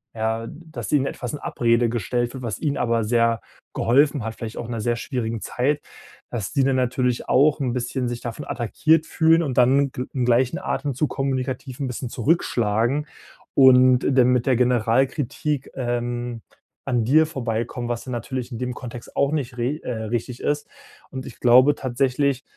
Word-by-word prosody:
ja, 110 +1 -2
dass 160 0 -8
ihnen 140 -3 +3
etwas 125 - -5
in 150 - -5
Abrede 115 0 +1
gestellt 120 +2 -1
wird, 130 - -7
was 110 -4 -4
ihnen 145 -3 0
aber 115 -2 +1
sehr 115 0 +2 0.3
geholfen 140 +1 +2
hat, 110 0 -5
vielleicht 115 -1 -7
auch - - -4
in 120 - -7
'ner 115 - -3
sehr 120 +2 0
schwierigen 115 -4 -3
Zeit, 145 +4 -1 0.5
dass 110 -5 -4
die 140 -3 +2
dann 135 0 +2
natürlich 125 -1 0
auch 145 +4 +4
'n 125 -3 0
bisschen 125 0 -2
sich 120 0 -5
davon 120 +4 -6
attackiert 155 +6 +1
fühlen 165 +1 +4
und 135 -5 -3
dann 135 +2 +4 0.2
im 130 -2 -1
gleichen 125 +7 +2
Atemzug 140 -4 -2
kommunikativ 130 -1 -3
'n 135 - -2
bisschen 125 0 -5
zurückschlagen 120 -1 +1 0.5
und 130 -1 +7
dann 130 -2 +4
mit 125 -1 +2
der 130 - +4
Generalkritik, 130 +4 0
ähm, 120 -1 -3 0.4
an 125 -4 +1
dir 155 +5 +5
vorbeikommen, 120 -3 -3
was 120 +1 -3
dann 130 - -6
natürlich 125 +2 -4
in 120 - -5
dem 125 0 -2
Kontext 120 -2 -9
auch 140 +1 +2
nicht 130 -5 -2
re 125 +5 -1
äh, 115 -3 -4
richtig 120 +2 -3
ist. 145 0 -1 0.4
Und 130 -1 -6
ich 120 - -11
glaube 130 +4 +6
tatsächlich- 135 +1 0
125 Hz, 175 wpm, -23 LUFS, 120-140 Hz, 0.5 s, und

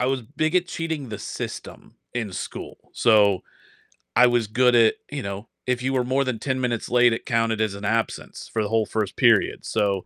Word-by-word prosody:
I 125 - +1
was 135 -1 0
big 155 +6 -2
at 180 -1 +3
cheating 160 -6 -4
the 105 -2 -6
system - - -7 0.2
in 110 -5 -3
school. - - -6 0.2
So 105 -4 +4 0.7
I 125 0 +7
was 120 -2 +1
good 125 +3 +3
at, 115 -2 +5 0.2
you 145 -2 -3
know, 100 +2 -6 0.2
if 125 -1 0
you 135 +1 0
were 125 -2 +2
more 130 +2 +1
than 130 -4 -3
10 130 +2 -2
minutes 120 -3 -2
late, 120 -1 +5
it - - -5
counted 115 -1 +1
as 110 -2 0
an 100 +1 -7
absence 115 +1 -2
for 110 - 0
the 105 - -3
whole 110 0 +2
1st 105 -3 -2
period. - - +3
So 100 -4 0
115 Hz, 210 wpm, -24 LUFS, 110-130 Hz, 0.7 s, I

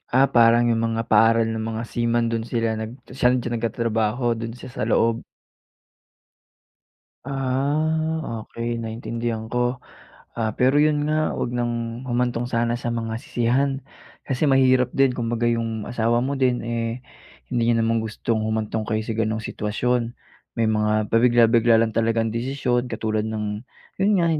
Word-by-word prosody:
Ah, 135 +2 +6
parang 115 0 +5
yung 115 -1 +1
mga 115 0 -1
paaral 115 +1 +5
nung 110 0 -3
mga 110 - -3
seaman 120 0 +1
dun 115 -1 -2
sila 115 -2 0
nag 110 0 -4 0.2
san 125 -1 +3
siya 120 - -4
nagtatrabaho 115 0 -1
dun 115 0 -5
siya 125 - -10
sa - - -5
loob. 115 0 +2 2.0
Ah, 140 0 -1
okey 120 0 -4
naintindihan 115 0 -4
ko. 125 +1 -1 0.6
Ah, 110 -1 0
pero 130 +3 +4
iyon 150 -1 +2
nga 155 0 +1
huwag - - -2
nang 120 0 -3
humantong 120 -1 0
sana 115 -1 +1
sa 120 - -4
mga 115 -1 -3
sisihan. 125 +4 +1 0.6
Kasi 135 +2 0
mahirap 130 -3 +4
din 135 -1 +3
kumbaga 120 0 0
yung 115 -2 -2
asawa 120 0 +1
mo 140 +1 -2
din 125 -2 +1
eh 115 +1 -2 0.5
hindi 120 -2 0
niya - - +2
naman 115 0 +1
gustong 110 +1 -2
humantong 110 0 -2
kayo 110 0 0
sa 110 - -3
ganong 110 0 0
sitwasyon. 115 +3 -1 0.4
May 115 -1 +2
mga 105 -1 +1
pabigla-bigla 115 -1 +5
lang 115 -1 +1
talagang 115 0 +1
desisyon 125 0 -1
katulad 110 -1 -1
ng, 105 0 -4 0.4
yun 200 +2 +3
nga, 170 - +2
115 Hz, 150 wpm, -23 LUFS, 115-125 Hz, 2.0 s, Ah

